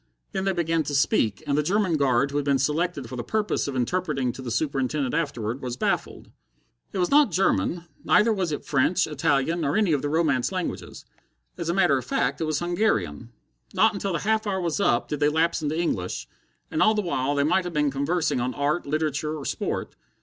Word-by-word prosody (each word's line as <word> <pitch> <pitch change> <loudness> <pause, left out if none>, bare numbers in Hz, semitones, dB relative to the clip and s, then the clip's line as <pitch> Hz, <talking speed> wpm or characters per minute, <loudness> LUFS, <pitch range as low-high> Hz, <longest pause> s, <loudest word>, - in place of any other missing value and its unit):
Then 190 - -2
they 195 - +2
began 165 -2 0
to 145 - -2
speak, 110 -7 +1
and 140 - 0
the 150 - +3
German 185 +2 +1
guard 140 -1 +2
who 145 - -2
had 145 - 0
been 140 -1 +2
selected 150 0 -1
for 130 - -7
the 120 - -4
purpose 215 - -1
of 140 - -4
interpreting 130 -1 0
to 130 - -9
the 125 - -5
Superintendent 135 0 -1
afterward, 130 -6 -2
was 125 -1 -4
baffled. - - -2 0.6
It - - -5
was 180 -1 0
not 290 0 +6
German 175 - +1 0.2
neither 220 +2 +4
was 185 -5 -1
it 145 - -4
French, 140 +5 +2
Italian, 150 +2 0
or 145 +4 +1
any 205 -7 +3
of 145 - +1
the 145 - -2
Romance 150 -4 +1
languages. 185 -2 -5 0.5
As 170 - -4
a - - +2
matter 145 -8 +3
of - - -7
fact, 135 +2 -1
it - - +1
was 155 -1 0
Hungarian. 140 - -1 0.4
Not 220 +4 +4
until 200 -2 -3
the - - +1
half 220 +1 0
hour 190 -2 0
was 170 -5 -1
up 120 - +2
did 150 - -3
they 145 0 +3
lapse 165 +2 +1
into 155 +2 -1
English, 95 - -2 0.4
and 155 - 0
all 215 0 +5
the 210 - 0
while 145 -5 -1
they 140 - +2
might 180 +5 +2
have 175 - -5
been 150 -2 +1
conversing 140 0 0
on 125 +1 -2
art, 145 +4 -1
literature, 155 0 -1
or 140 - -7
sport. - - -3
150 Hz, 215 wpm, -25 LUFS, 135-175 Hz, 0.6 s, not